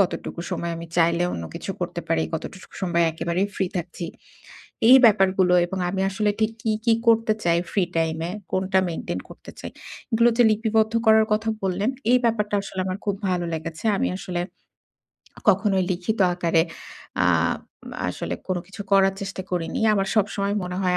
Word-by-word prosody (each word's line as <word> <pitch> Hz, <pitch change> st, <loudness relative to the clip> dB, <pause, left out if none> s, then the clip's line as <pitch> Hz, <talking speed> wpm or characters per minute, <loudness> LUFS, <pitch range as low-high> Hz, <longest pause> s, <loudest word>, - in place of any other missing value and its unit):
কতটুকু 175 Hz, -2 st, -1 dB
সময় 170 Hz, -2 st, -2 dB
আমি 170 Hz, 0 st, -7 dB
চাইলে 170 Hz, +1 st, +3 dB
অন্য 85 Hz, -, -4 dB
কিছু -, -, -5 dB
করতে -, -, -3 dB
পারি। 80 Hz, -, +2 dB
কতটুকু 190 Hz, -, -6 dB
স -, -, -15 dB
সময় 170 Hz, -2 st, +2 dB
একেবারেই 170 Hz, +4 st, -1 dB
ফ্রি 190 Hz, -, 0 dB
থাকছি। 175 Hz, 0 st, -4 dB, 0.8 s
এই 260 Hz, -, +11 dB
ব্যাপারগুলো 190 Hz, -3 st, +4 dB
এবং 190 Hz, +2 st, -5 dB
আমি 190 Hz, +1 st, -2 dB
আসলে 210 Hz, +2 st, 0 dB
ঠিক 220 Hz, 0 st, +2 dB
কী, 220 Hz, -, 0 dB
কী 230 Hz, -, +5 dB
করতে 225 Hz, -1 st, +4 dB
চাই 170 Hz, -1 st, +3 dB
ফ্রি 195 Hz, -, +2 dB
টাইমে? 165 Hz, +1 st, -1 dB, 0.2 s
কোনটা 190 Hz, 0 st, +1 dB
মেইনটেইন 165 Hz, -, -4 dB
করতে -, -, -12 dB
চাই? -, -, -6 dB, 0.4 s
এগুলো 230 Hz, +1 st, +5 dB
যে 245 Hz, -, +6 dB
লিপিবদ্ধ 220 Hz, +1 st, +1 dB
করার 220 Hz, 0 st, +6 dB
কথা 220 Hz, +1 st, 0 dB
বললেন, 195 Hz, +5 st, 0 dB, 0.2 s
এই 250 Hz, -, +7 dB
ব্যাপারটা 210 Hz, -3 st, +1 dB
আসলে 190 Hz, -1 st, -7 dB
আমার 185 Hz, +1 st, -2 dB
খুব 200 Hz, -1 st, 0 dB
ভালো 175 Hz, -1 st, 0 dB
লেগেছে। 160 Hz, +4 st, -5 dB
আমি -, -, +1 dB
আসলে 180 Hz, -3 st, -3 dB, 1.1 s
কখনোই 195 Hz, -4 st, +3 dB
লিখিত 185 Hz, +5 st, -1 dB, 0.2 s
আকারে 170 Hz, -2 st, +2 dB, 0.6 s
আব -, -, +2 dB, 0.5 s
আসলে -, -, -4 dB
কোন 185 Hz, -1 st, -1 dB
কিছু 205 Hz, +2 st, -8 dB
করার 195 Hz, 0 st, +5 dB
চেষ্টা 195 Hz, -1 st, -5 dB
করিনি। 175 Hz, +2 st, -2 dB
আমার 195 Hz, -2 st, +1 dB
সবসময় 200 Hz, -1 st, 0 dB
মনে 180 Hz, 0 st, -4 dB
হয় 180 Hz, -1 st, +2 dB
190 Hz, 170 wpm, -24 LUFS, 175-210 Hz, 1.1 s, এই